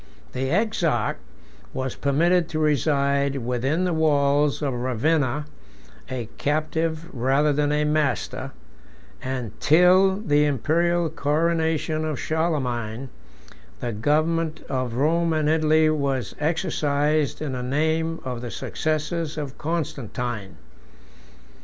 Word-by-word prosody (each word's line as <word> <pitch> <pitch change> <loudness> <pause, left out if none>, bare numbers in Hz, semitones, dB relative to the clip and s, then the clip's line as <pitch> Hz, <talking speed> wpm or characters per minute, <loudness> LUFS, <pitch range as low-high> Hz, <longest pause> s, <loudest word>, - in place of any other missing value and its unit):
The 130 +1 -2
exarch 170 - 0 0.6
was 130 -1 -2
permitted 165 +5 +2
to 155 - -3
reside 140 -2 +1
within 130 +6 -1
the 180 -1 0
walls 145 -2 +2
of 140 -3 0
Ravenna, 130 +4 0 0.6
a 125 -4 -4
captive 160 +2 -1
rather 135 +4 +2
than 145 0 +1
a 150 0 +2
master; 150 -3 0 0.7
and 130 -5 -4
till 180 +4 +5
the 150 -8 +2
Imperial 165 +5 +1
coronation 160 +1 0
of 155 -3 -2
Charlemagne, 130 -7 -2 0.7
the 120 - -3
government 155 +7 0
of 130 -3 -2
Rome 165 +5 +2
and 155 -1 +1
Italy 155 0 +4
was 135 -6 -1
exercised 150 -2 0
in 155 -3 -3
the 125 -1 -3
name 160 +5 0
of 125 -2 -4
the 120 - -5
successors 155 +4 -2
of 145 -3 -5
Constantine. 125 - -3
150 Hz, 110 wpm, -24 LUFS, 130-160 Hz, 0.7 s, till